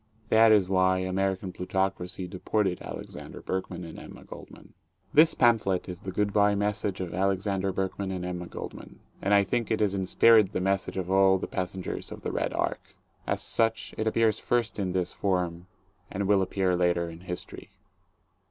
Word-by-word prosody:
That 110 0 +6
is 100 -4 +5
why 95 -1 +3
American 95 +1 -1
plutocracy 95 0 -2
deported 95 +1 -1
Alexander - - -8
Berkman 95 -1 -4
and 85 - -9
Emma - - -11
Goldman. - - -13 0.4
This 155 +2 +6
pamphlet 110 -6 +2
is 90 -1 -6
the 95 -2 -6
"good 105 +2 0
bye 105 0 +4
message" 105 -1 -1
of 90 -2 -4
Alexander 95 +1 0
Berkman 95 +1 -3
and 90 -1 -4
Emma 90 -1 -4
Goldman; - - -9 0.2
and 100 - -1
I 100 -1 +6
think 115 +3 -1
it 110 - +1
is 105 -2 +2
in 95 -1 -2
spirit 110 -1 +5
the - - 0
message 95 +1 -1
of 95 0 -3
all 95 0 +5
the - - -4
passengers 95 0 -4
of - - -9
the - - -2
"Red - - -1
Ark." - - -3 0.3
As - - -1
such 115 0 0
it 110 - -2
appears 110 -1 +2
first 120 -3 -1
in 95 -2 -1
this 90 -1 -1
form 90 -2 -1 0.4
and 100 0 -2
will 100 -1 +4
appear 95 -1 +1
later 85 -1 +1
in 85 0 -9
history. 90 0 -6
95 Hz, 180 wpm, -28 LUFS, 90-105 Hz, 0.4 s, That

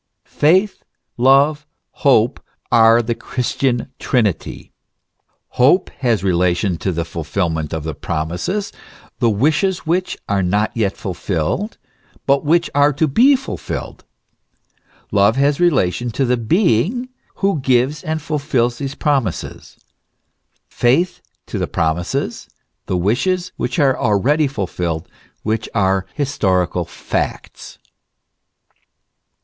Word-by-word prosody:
Faith, 185 +7 +2 0.3
love, 140 +4 +3 0.2
hope, 125 -3 +2 0.3
are 115 0 +6
the 115 +1 -1
Christian 125 +1 -2
Trinity. 110 - -1 0.8
Hope 145 +9 +3
has 120 -6 +1
relation 90 0 +1
to 95 - -2
the 85 -1 -2
fulfilment 80 -1 -2
of 80 -2 -3
the 80 0 -4
promises, 90 - -3 0.5
the 120 - +3
wishes 155 - +1
which 180 +3 -1
are 100 -1 +1
not 105 +4 0
yet 105 -4 -1
fulfilled, 95 - -3 0.5
but 140 0 +2
which 170 +3 +2
are 145 +1 +4
to 155 +3 +1
be 255 - +5
fulfilled; 270 +1 -6 1.1
love 100 +2 +4
has 140 +1 +2
relation 120 - +1
to 135 +4 -1
the 125 0 +2
Being 175 - +1 0.3
who 195 -5 0
gives 130 +2 +1
and 160 -2 -2
fulfils 140 -6 -1
these 135 0 -4
promises; 135 - -2 0.9
faith 155 +10 +1 0.2
to - - -5
the - - -1
promises, 85 - -2 0.4
the 90 - 0
wishes, 175 - 0
which - - -3
are 140 -4 +3
already 130 +9 +2
fulfilled, 90 - -3 0.4
which 110 0 -2
are 95 -2 +1
historical 95 - 0
facts. - - -5
120 Hz, 110 wpm, -18 LUFS, 95-150 Hz, 1.1 s, are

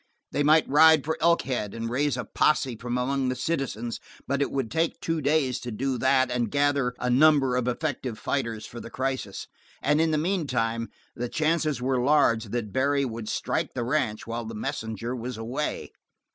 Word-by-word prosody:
They 145 - 0
might 155 +2 +5
ride 155 +1 +6
for 160 - 0
Elkhead 130 -11 +1
and 115 0 -3
raise 130 +2 0
a 125 - -3
posse 135 -5 +1
from 120 +2 -3
among 130 +1 0
the 130 - -1
citizens, 125 -5 -2 0.3
but 140 0 0
it 140 - +1
would 135 -5 -2
take 165 0 0
two 165 -1 -2
days 140 -3 +1
to 125 - -6
do 130 +3 -2
that 130 0 +3
and 120 -2 0
gather 140 -2 +1
a 125 - -3
number 135 0 +4
of 125 -1 0
effective 125 -3 -2
fighters 115 -6 -2
for 120 - -9
the 115 - -8
crisis, 130 -6 -3 0.3
and 150 +3 +2
in 165 - +2
the 155 - +1
meantime 130 -10 -1 0.3
the 120 0 -3
chances 155 -3 0
were 130 -1 +1
large 125 -5 +3
that 105 -1 -4
Barry 140 +1 +2
would 115 -3 -5
strike - - -2
the 120 - -1
ranch 120 -4 -1
while 115 0 -4
the 110 0 -6
messenger 110 +2 -4
was 125 -1 -5
away. 125 +7 -3
130 Hz, 185 wpm, -26 LUFS, 115-145 Hz, 0.3 s, ride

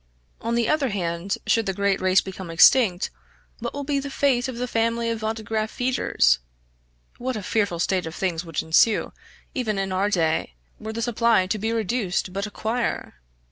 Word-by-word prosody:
On 230 +1 -1
the 235 -2 +1
other 300 -4 +2
hand 175 -1 -2
should 225 -2 +2
the 195 - -1
great 200 -1 +1
race 185 0 +4
become 190 -2 -8
extinct, 185 +2 +5 0.5
what - - -4
will 285 - -5
be 280 0 0
the 280 +1 -5
fate 270 -2 +1
of 255 -2 -5
the 250 +1 -2
family 230 0 0
of 225 -1 -4
autograph 220 0 -2
feeders? 245 - +2 0.8
What 255 +1 -2
a 210 - -4
fearful 205 -4 0
state 180 0 0
of 160 - -7
things 175 -3 -1
would 165 -3 -4
ensue, 185 +7 +3 0.4
even 220 -6 -1
in 195 -1 -1
our 190 +2 +1
day, 160 - 0 0.2
were 220 - -5
the 230 +1 -3
supply 230 -4 +3
to 205 +3 -2
be 220 +3 -1
reduced 215 -5 -1
but 200 +2 -2
a - - -8
quire! 230 +3 -2
215 Hz, 185 wpm, -24 LUFS, 185-235 Hz, 0.8 s, extinct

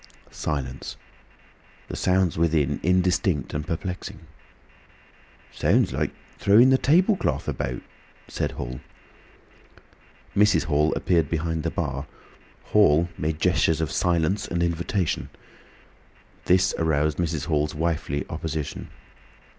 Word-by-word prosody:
Silence. 65 -4 -4 0.9
The - - -6
sounds 95 -2 +1
within 80 -4 +1
indistinct 90 - +1
and 75 0 -3
perplexing. 90 +2 -5 1.3
"Sounds - - +2
like - - 0 0.3
throwing 115 +6 +6
the 130 - +4
table 180 +9 +4
cloth 180 - -2
about," 60 -1 -3 0.4
said - - -3
Hall. 60 0 -6 1.6
Mrs. 105 -1 +4
Hall 75 -1 +2
appeared 85 -5 +1
behind 80 0 -1
the - - -1
bar. 70 +2 -3 0.6
Hall 85 -5 +4
made 75 0 -2
gestures 80 -2 +2
of 80 -3 -2
silence 90 +3 +1
and 85 0 -1
invitation. 85 +1 -1 1.2
This 90 +1 +3
aroused 75 -1 +1
Mrs. 80 -4 -1
Hall's 75 -2 0
wifely 75 -3 -1
opposition. 80 -1 -5
80 Hz, 105 wpm, -25 LUFS, 75-90 Hz, 1.6 s, throwing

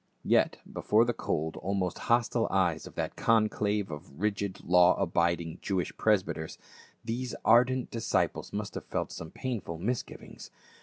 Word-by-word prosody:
Yet - - +3
before 110 +2 +2
the 120 - 0
cold, 80 -7 -2
almost 95 -2 -2
hostile 120 0 +2
eyes 90 -5 +1
of - - -13
that - - -3
conclave 105 -3 +1
of 75 -1 -9
rigid 100 -1 -2
law 90 0 +6
abiding 85 -1 0
Jewish 95 -3 -2
presbyters, 95 -7 0 0.5
these 120 +2 -3
ardent 125 +2 +4
disciples 115 -2 -1
must - - -4
have - - -6
felt - - -3
some 80 - -7
painful 110 -10 -4
misgivings. 115 +8 -5
100 Hz, 140 wpm, -29 LUFS, 85-115 Hz, 0.5 s, law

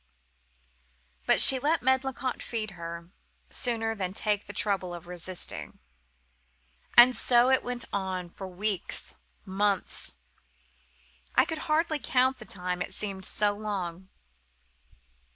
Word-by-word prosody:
But - - +4
she 265 - +9
let 300 +4 +1
Medlicott 260 0 0
feed 220 -3 -4
her, 170 -1 -8 0.4
sooner 225 -2 -1
than 190 -4 -3
take 210 -2 -1
the - - -6
trouble 190 -4 0
of 170 - -10
resisting. 175 - -5 1.2
"And 245 +1 +9
so 245 +1 +4
it 265 - +3
went 245 -1 -2
on,—for 190 -1 -4
weeks, 190 +1 -2 0.3
months—I 65 - -3
could 320 - -4
hardly 310 0 +2
count 260 -1 +1
the 215 - -10
time, 180 -2 -3
it - - -4
seemed 195 -3 -3
so 210 -1 +2
long. 190 -4 -5
195 Hz, 115 wpm, -28 LUFS, 175-240 Hz, 1.2 s, she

